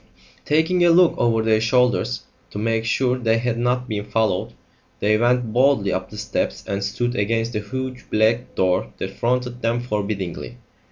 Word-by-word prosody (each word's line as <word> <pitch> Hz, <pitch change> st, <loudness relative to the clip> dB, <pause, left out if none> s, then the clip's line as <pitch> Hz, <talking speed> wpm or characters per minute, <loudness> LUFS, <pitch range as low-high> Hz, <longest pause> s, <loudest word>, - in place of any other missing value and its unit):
Taking 160 Hz, +4 st, +2 dB
a 175 Hz, -, +5 dB
look 170 Hz, +1 st, +5 dB
over 115 Hz, -2 st, +2 dB
their 110 Hz, -1 st, +2 dB
shoulders 125 Hz, -, +1 dB, 0.3 s
to -, -, -8 dB
make 115 Hz, +1 st, 0 dB
sure 125 Hz, +2 st, +1 dB
they 115 Hz, -2 st, +2 dB
had 115 Hz, 0 st, -1 dB
not 125 Hz, +1 st, 0 dB
been 105 Hz, -3 st, -3 dB
followed, 110 Hz, -3 st, -1 dB, 0.5 s
they 105 Hz, +1 st, +2 dB
went 120 Hz, 0 st, +1 dB
boldly 125 Hz, -5 st, +3 dB
up 95 Hz, 0 st, -3 dB
the 105 Hz, -, -10 dB
steps 105 Hz, 0 st, -2 dB
and 100 Hz, 0 st, -3 dB
stood 120 Hz, +4 st, -2 dB
against 115 Hz, +2 st, 0 dB
the 105 Hz, -, -1 dB
huge 130 Hz, +4 st, -6 dB
black 110 Hz, +3 st, +1 dB
door 95 Hz, 0 st, +1 dB
that 95 Hz, -, -4 dB
fronted 125 Hz, +3 st, -2 dB
them 115 Hz, +1 st, 0 dB
forbiddingly. 105 Hz, -1 st, -4 dB
115 Hz, 170 wpm, -22 LUFS, 105-125 Hz, 0.5 s, a